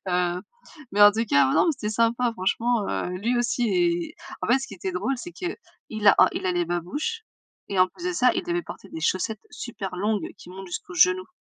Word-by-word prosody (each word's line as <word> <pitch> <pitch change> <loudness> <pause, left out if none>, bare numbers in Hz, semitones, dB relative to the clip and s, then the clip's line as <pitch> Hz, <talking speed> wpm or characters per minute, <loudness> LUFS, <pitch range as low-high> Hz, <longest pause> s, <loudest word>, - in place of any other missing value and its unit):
Heu, 180 0 0 0.5
mais 205 +1 +4
en 205 - +10
tout 225 +2 0
cas 140 -8 +4
mais - - +1
non, - - +4
mais 325 - +3
c'était 215 -6 -4
sympa 230 +1 +2
franchement 225 +3 0
heu, - - -2
lui 235 +5 0
aussi 240 0 +1
et, 175 -2 +1 0.3
en - - -2
fait 245 +4 +4
ce 270 - -6
qui - - -13
était 190 0 -4
drôle 235 +9 -1
c'est 350 +7 -8
qu'il 360 0 -4 0.5
a - - +9
a - - +6
il - - -3
a 180 - +2
les 175 0 +1
babouches, 290 - -3 0.4
et 195 - -2
en 185 - +5
plus 350 - -12
de - - -1
ça 250 -7 +4
il 365 - -1
devait 350 0 -2
porter 195 - -10
des 160 - -7
chaussettes 210 +6 0
super 205 -6 -6
longues 210 +1 0
qui - - -14
montent 190 +1 -9
jusqu'aux 180 0 -7
genoux. 185 +2 +4
205 Hz, 235 wpm, -25 LUFS, 180-245 Hz, 0.5 s, en